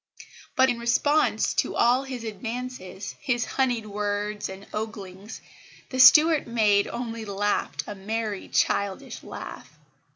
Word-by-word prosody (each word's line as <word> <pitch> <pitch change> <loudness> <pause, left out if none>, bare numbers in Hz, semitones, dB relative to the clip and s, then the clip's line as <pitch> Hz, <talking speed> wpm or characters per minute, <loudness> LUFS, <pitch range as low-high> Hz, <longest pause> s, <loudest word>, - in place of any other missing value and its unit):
But, 260 0 +5
in 235 - -4
response 290 +6 +2
to - - 0
all 245 +2 +4
his 255 -3 -6
advances, 225 -2 -6
his 240 -3 0
honeyed 245 -4 0
words 210 0 -3
and 190 +1 -9
oglings, 205 -1 -6 0.5
the 260 - -3
Stuart 305 +4 +7
maid 210 -4 +3
only 230 -2 -5
laughed 205 0 -1
a 210 - -6
merry 210 +1 -4
childish 200 -1 -1
laugh. - - -9
225 Hz, 125 wpm, -26 LUFS, 205-250 Hz, 0.5 s, Stuart